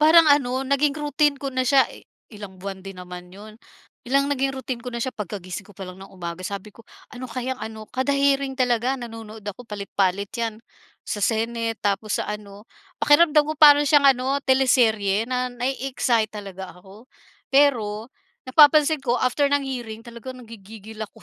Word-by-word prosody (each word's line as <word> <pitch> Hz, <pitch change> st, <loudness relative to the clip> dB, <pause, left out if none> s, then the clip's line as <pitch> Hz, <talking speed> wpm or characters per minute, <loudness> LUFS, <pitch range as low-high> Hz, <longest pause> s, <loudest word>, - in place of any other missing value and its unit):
Parang 320 Hz, +1 st, +7 dB
ano, 265 Hz, -2 st, +3 dB
naging 280 Hz, +1 st, +2 dB
routine 295 Hz, 0 st, +1 dB
ko 275 Hz, -, -4 dB
na 255 Hz, 0 st, 0 dB
siya, 270 Hz, +1 st, +5 dB
eh -, -, -14 dB, 0.3 s
ilang 205 Hz, -3 st, -10 dB
buwan 195 Hz, 0 st, -6 dB
din 195 Hz, 0 st, -10 dB
naman 180 Hz, 0 st, -9 dB
yun. 210 Hz, +3 st, -12 dB, 0.5 s
Biglang 275 Hz, +3 st, +2 dB
naging 275 Hz, -1 st, 0 dB
routine 260 Hz, -2 st, -5 dB
ko 250 Hz, -, -6 dB
na 235 Hz, -, -5 dB
siya, 255 Hz, +2 st, -3 dB
pagkagising 195 Hz, -2 st, -6 dB
ko 205 Hz, -, -17 dB
pa 195 Hz, -, -7 dB
lang 185 Hz, +1 st, -11 dB
ng 195 Hz, -, -13 dB
umaga, 170 Hz, -2 st, -7 dB
sabi 200 Hz, +1 st, -6 dB
ko 230 Hz, -, -15 dB, 0.3 s
"Ano 255 Hz, 0 st, -7 dB
kayang 255 Hz, +2 st, -4 dB
ano" 220 Hz, -1 st, -7 dB
Kada 260 Hz, +2 st, -1 dB
hearing 275 Hz, -1 st, +1 dB
talaga 250 Hz, +1 st, +1 dB
nanonood 225 Hz, -3 st, -9 dB
ako, 205 Hz, +4 st, -6 dB
palit-palit 200 Hz, -1 st, -1 dB
yan, 230 Hz, -2 st, -3 dB, 0.5 s
sa 205 Hz, -, -3 dB
senate, 230 Hz, +1 st, -1 dB
tapos 205 Hz, +1 st, -1 dB
sa -, -, -1 dB
ano. 210 Hz, -1 st, -7 dB, 0.3 s
Pakiramdam 300 Hz, 0 st, +5 dB
ko 310 Hz, -, -2 dB
para 290 Hz, -1 st, +8 dB
siyang 280 Hz, -1 st, +6 dB
ano, 265 Hz, +3 st, -1 dB
teleserye 225 Hz, -6 st, +3 dB
na 255 Hz, 0 st, -1 dB
na-e-excite 250 Hz, -3 st, -1 dB
talaga 195 Hz, -2 st, -8 dB
ako. 195 Hz, +6 st, -16 dB, 0.5 s
Pero, 230 Hz, -6 st, +2 dB, 0.4 s
napapansin 300 Hz, +2 st, +6 dB
ko 245 Hz, -3 st, -1 dB
after 255 Hz, +3 st, +2 dB
ng 285 Hz, 0 st, +2 dB
hearing 240 Hz, -5 st, -6 dB
talaga 235 Hz, +2 st, -9 dB
nangigigil 220 Hz, -2 st, -12 dB
ako. 210 Hz, -, -17 dB
235 Hz, 170 wpm, -23 LUFS, 205-270 Hz, 0.5 s, para